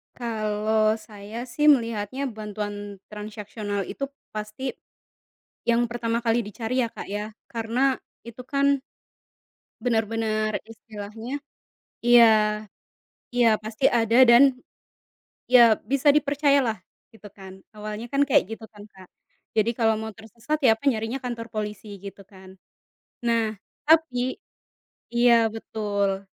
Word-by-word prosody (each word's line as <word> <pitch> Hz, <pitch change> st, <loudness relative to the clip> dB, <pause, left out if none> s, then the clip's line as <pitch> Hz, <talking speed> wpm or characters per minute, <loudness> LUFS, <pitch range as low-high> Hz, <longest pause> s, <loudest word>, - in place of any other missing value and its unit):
Kalau 215 Hz, -1 st, 0 dB
saya 215 Hz, +1 st, -8 dB
sih 295 Hz, +5 st, 0 dB
melihatnya 235 Hz, 0 st, +2 dB
bantuan 205 Hz, -2 st, -6 dB
transaksional 210 Hz, -1 st, -5 dB
itu 275 Hz, +8 st, -5 dB, 0.2 s
pasti, 215 Hz, +5 st, -5 dB, 1.0 s
yang 235 Hz, 0 st, +2 dB
pertama 235 Hz, -1 st, -1 dB
kali 230 Hz, -1 st, +1 dB
dicari 225 Hz, +4 st, -3 dB
ya -, -, -3 dB
Kak, -, -, -8 dB
ya 210 Hz, +2 st, -4 dB, 0.2 s
karena 240 Hz, +4 st, 0 dB, 0.3 s
itu 235 Hz, +2 st, -9 dB
kan 280 Hz, 0 st, +1 dB, 1.0 s
benar 225 Hz, -3 st, +1 dB
benar 215 Hz, -2 st, -1 dB
istilahnya, 220 Hz, +3 st, -7 dB, 0.7 s
iya, 220 Hz, -3 st, +6 dB, 0.8 s
iya 230 Hz, -3 st, +4 dB
pasti 220 Hz, +3 st, -8 dB
ada 235 Hz, +2 st, +5 dB
dan, 240 Hz, +2 st, +8 dB, 1.1 s
iya 235 Hz, -3 st, +8 dB, 0.2 s
bisa 275 Hz, +1 st, +1 dB
dipercayalah 280 Hz, -5 st, +2 dB, 0.3 s
gitu 225 Hz, -2 st, -18 dB
kan 190 Hz, -1 st, -11 dB, 0.2 s
awalnya 215 Hz, +2 st, -6 dB
kan 275 Hz, +3 st, 0 dB
kayak 270 Hz, -9 st, +4 dB
gitu 225 Hz, -, -10 dB
kan 205 Hz, -1 st, -13 dB
Kak, 185 Hz, -1 st, -15 dB, 0.5 s
jadi 220 Hz, +2 st, +3 dB
kalau 225 Hz, -1 st, +2 dB
mau 220 Hz, 0 st, -5 dB
tersesat 230 Hz, +9 st, -5 dB
ya 225 Hz, -5 st, +5 dB
apa 285 Hz, -, -14 dB
nyarinya 230 Hz, +1 st, 0 dB
kantor 235 Hz, -2 st, -5 dB
polisi 210 Hz, -1 st, -5 dB
gitu 200 Hz, 0 st, -10 dB
kan, 190 Hz, -1 st, -15 dB, 0.7 s
nah 230 Hz, -2 st, +1 dB, 0.3 s
tapi 275 Hz, -6 st, +2 dB, 0.7 s
iya 235 Hz, -2 st, +4 dB
betul, 200 Hz, -3 st, -2 dB
225 Hz, 120 wpm, -25 LUFS, 210-240 Hz, 1.1 s, dan